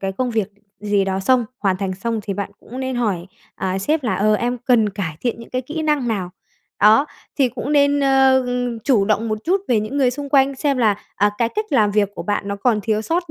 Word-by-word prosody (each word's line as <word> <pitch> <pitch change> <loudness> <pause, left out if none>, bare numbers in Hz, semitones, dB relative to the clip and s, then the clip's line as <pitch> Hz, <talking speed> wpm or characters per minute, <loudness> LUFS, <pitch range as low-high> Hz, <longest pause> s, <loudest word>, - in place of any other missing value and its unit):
cái 195 0 -2
công 250 +5 -2
việc 220 -4 -1 0.3
gì 205 -1 +1
đó 190 0 -1
xong, 245 +5 +3
hoàn 195 -3 +1
thành 190 -1 -3
xong 225 +3 -3
thì 200 - -4
bạn 200 0 -4
cũng 255 +3 -8
nên 260 -1 -3
hỏi, 200 -8 -1 0.3
à, 190 0 -2
sếp 295 +10 0
là 225 - 0
"Ờ, 215 +2 +2
em 245 +3 -1
cần 235 -3 +3
cải 185 -6 -4
thiện 240 -2 -2
những 230 - -12
cái 255 0 -2
kỹ 310 +5 -5
năng 300 -5 +1
nào?" 195 -5 -2 0.5
Đó, 220 +7 +6 0.3
thì 265 -3 +4
cũng 275 +4 -4
nên, 285 0 +3
ơ, 265 -1 +4
ừm, 245 -1 -2
chủ 220 -4 +2
động 215 +2 0
một 215 -1 -1
chút 375 +4 +2
về 230 -4 +3
những 215 +7 -4
người 265 -3 +3
xung 285 +3 -6
quanh, 275 0 +3
xem 275 0 0
là, 215 -4 +3 0.2
à, 205 +1 +3
cái 235 - +2
cách 430 - -3
làm 215 -6 +4
việc 205 -1 +2
của - - -5
bạn 205 -1 -2
nó 200 - -2
còn 215 +1 +1
thiếu 215 0 -1
sót 340 +6 -2
230 Hz, 250 wpm, -20 LUFS, 205-265 Hz, 0.5 s, Đó